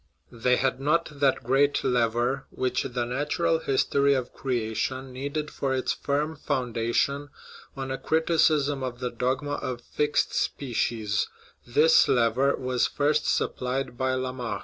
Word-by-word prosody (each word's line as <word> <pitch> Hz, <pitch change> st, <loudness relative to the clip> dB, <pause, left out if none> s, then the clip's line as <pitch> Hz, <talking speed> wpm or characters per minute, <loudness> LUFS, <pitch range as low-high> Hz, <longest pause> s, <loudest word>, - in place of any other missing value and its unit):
They 125 Hz, +1 st, +2 dB
had 130 Hz, 0 st, 0 dB
not 150 Hz, +1 st, 0 dB
that 135 Hz, -2 st, +2 dB
great 135 Hz, +4 st, +2 dB
lever 120 Hz, +2 st, +1 dB
which 130 Hz, 0 st, -1 dB
the 125 Hz, -2 st, -2 dB
"natural 150 Hz, +6 st, 0 dB
history 140 Hz, -1 st, +2 dB
of 130 Hz, -2 st, -3 dB
creation" 130 Hz, +1 st, -2 dB
needed 145 Hz, +3 st, -4 dB
for 135 Hz, -1 st, -1 dB
its 130 Hz, -, 0 dB
firm 150 Hz, +3 st, -1 dB
foundation 130 Hz, +3 st, -1 dB, 0.5 s
on 135 Hz, -1 st, -4 dB
a 135 Hz, -, -3 dB
criticism 155 Hz, -3 st, +2 dB
of 125 Hz, -2 st, -4 dB
the 125 Hz, -1 st, -3 dB
dogma 130 Hz, +4 st, -1 dB
of 125 Hz, -2 st, -4 dB
fixed 150 Hz, +4 st, 0 dB
species; 115 Hz, -6 st, -1 dB, 0.4 s
this 155 Hz, +7 st, +5 dB
lever 125 Hz, +3 st, +3 dB
was 125 Hz, -1 st, 0 dB
first 150 Hz, +1 st, +1 dB
supplied 125 Hz, 0 st, -1 dB
by 130 Hz, +1 st, 0 dB
Lamarck. 125 Hz, -5 st, -3 dB
130 Hz, 135 wpm, -26 LUFS, 125-145 Hz, 0.5 s, this